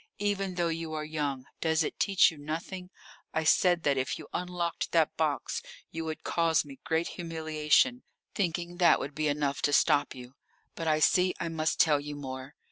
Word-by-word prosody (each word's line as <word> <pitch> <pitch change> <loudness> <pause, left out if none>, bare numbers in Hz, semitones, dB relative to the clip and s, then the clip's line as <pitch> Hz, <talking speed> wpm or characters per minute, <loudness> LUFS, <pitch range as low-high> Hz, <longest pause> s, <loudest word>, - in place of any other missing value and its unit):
Even 195 -2 -1
though 175 -1 +1
you 165 -1 -4
are 155 0 -3
young, 145 -4 -3
does 160 0 +2
it - - -5
teach 195 -2 +5
you 160 - -12
nothing? 170 +5 -5 0.5
I 160 - +1
said 175 +1 +4
that 140 -2 +2
if 130 - -2
you - - -10
unlocked 180 -1 -3
that - - +3
box - - -1 0.3
you 165 0 -4
would 160 -1 -5
cause 165 -2 +2
me 140 -2 -11
great 165 +1 0
humiliation, 160 - +1 0.3
thinking 175 -2 -2
that 175 -2 +5
would 140 - -5
be 155 +1 -1
enough 145 -1 -1
to 145 - +2
stop 145 0 +3
you. 125 0 -11 0.4
But 165 - -5
I 155 0 +2
see 180 +3 +4
I 170 - -2
must 160 0 -1
tell 150 -3 +5
you 145 0 -6
more. 130 -1 -7
160 Hz, 190 wpm, -29 LUFS, 145-175 Hz, 0.5 s, teach